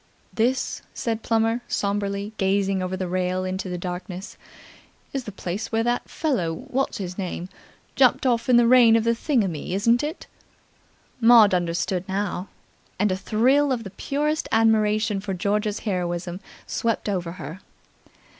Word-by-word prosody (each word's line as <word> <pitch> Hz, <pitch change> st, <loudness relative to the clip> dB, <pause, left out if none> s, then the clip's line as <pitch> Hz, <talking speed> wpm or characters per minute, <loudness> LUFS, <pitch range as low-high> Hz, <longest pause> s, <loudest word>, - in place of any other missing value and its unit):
"This," 250 Hz, +4 st, 0 dB
said 225 Hz, -1 st, -2 dB
Plummer 225 Hz, +1 st, +1 dB
sombrely, 200 Hz, +1 st, -2 dB
gazing 195 Hz, -1 st, +1 dB
over 185 Hz, 0 st, -3 dB
the 185 Hz, -1 st, -3 dB
rail 185 Hz, +1 st, -1 dB
into 185 Hz, 0 st, -3 dB
the 180 Hz, -, -3 dB
darkness, 180 Hz, +2 st, -6 dB, 0.8 s
"is 270 Hz, -3 st, -3 dB
the 210 Hz, -, -6 dB
place 190 Hz, +2 st, -5 dB
where 225 Hz, 0 st, +1 dB
that 240 Hz, +1 st, -1 dB
fellow 255 Hz, -, -1 dB
what's 265 Hz, -, -2 dB
his 185 Hz, -2 st, -5 dB
name 180 Hz, -1 st, -4 dB, 0.5 s
jumped 260 Hz, 0 st, +4 dB
off 240 Hz, 0 st, +1 dB
in 245 Hz, -, +6 dB
the 240 Hz, -, +5 dB
reign 235 Hz, -2 st, +7 dB
of 225 Hz, -, +3 dB
thingummy, 225 Hz, -, 0 dB
isn't 230 Hz, +5 st, +3 dB
it?" 300 Hz, +4 st, -5 dB, 0.9 s
Maud 230 Hz, -4 st, +7 dB
understood 175 Hz, +1 st, 0 dB
now, 195 Hz, -1 st, -2 dB, 0.5 s
and 205 Hz, +1 st, +2 dB
a -, -, +1 dB
thrill 255 Hz, +9 st, +2 dB
of 240 Hz, -3 st, -1 dB
the 195 Hz, -, -8 dB
purest 300 Hz, +9 st, -2 dB
admiration 215 Hz, -1 st, +3 dB
for 195 Hz, -1 st, -4 dB
George's 210 Hz, +3 st, -1 dB
heroism 175 Hz, -3 st, -2 dB, 0.3 s
swept 230 Hz, -2 st, -1 dB
over 180 Hz, -4 st, -2 dB
her. 185 Hz, 0 st, -8 dB
205 Hz, 145 wpm, -24 LUFS, 185-230 Hz, 0.9 s, reign